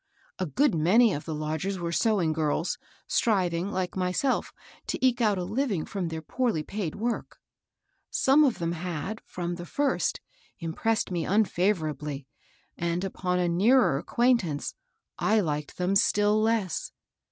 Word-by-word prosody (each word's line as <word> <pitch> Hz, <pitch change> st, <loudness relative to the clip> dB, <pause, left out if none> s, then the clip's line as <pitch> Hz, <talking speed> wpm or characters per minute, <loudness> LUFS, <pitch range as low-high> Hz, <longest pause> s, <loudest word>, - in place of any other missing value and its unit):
A 185 Hz, -, -1 dB
good 275 Hz, -, +2 dB
many 190 Hz, +8 st, +4 dB
of 145 Hz, -, -5 dB
the 160 Hz, -, -3 dB
lodgers 155 Hz, +6 st, -2 dB
were 170 Hz, -1 st, -3 dB
sewing 185 Hz, -4 st, +2 dB
girls, 155 Hz, +1 st, -1 dB, 0.3 s
stnving, 185 Hz, -5 st, +1 dB
like 185 Hz, -2 st, -2 dB
myself, 185 Hz, +8 st, 0 dB, 0.4 s
to -, -, -1 dB
eke 255 Hz, -1 st, +2 dB
out 210 Hz, -3 st, +3 dB
a 180 Hz, -, -2 dB
living 205 Hz, -, -1 dB
from 195 Hz, -4 st, -3 dB
their 160 Hz, -1 st, -5 dB
poorly 230 Hz, -5 st, 0 dB
paid 195 Hz, -3 st, -4 dB
work. 230 Hz, +2 st, -3 dB, 0.7 s
Some 275 Hz, +3 st, +4 dB
of 265 Hz, -6 st, +2 dB
them 170 Hz, -1 st, -1 dB
had, 175 Hz, +4 st, -4 dB
from 175 Hz, -1 st, -4 dB
the 175 Hz, -, -7 dB
first, 285 Hz, -, 0 dB, 0.4 s
impressed 190 Hz, +6 st, -1 dB
me 170 Hz, -2 st, -1 dB
unfavorably, 160 Hz, -9 st, 0 dB, 0.5 s
and 170 Hz, +1 st, -1 dB
upon 180 Hz, -1 st, -1 dB
a 180 Hz, -1 st, +1 dB
nearer 185 Hz, -, +4 dB
acquaintance 230 Hz, -, +1 dB, 0.5 s
I 220 Hz, -, +3 dB
Uked 150 Hz, -7 st, -1 dB
them 180 Hz, +2 st, 0 dB
still 205 Hz, +2 st, +3 dB
less. 220 Hz, -6 st, 0 dB
185 Hz, 145 wpm, -27 LUFS, 165-220 Hz, 0.7 s, many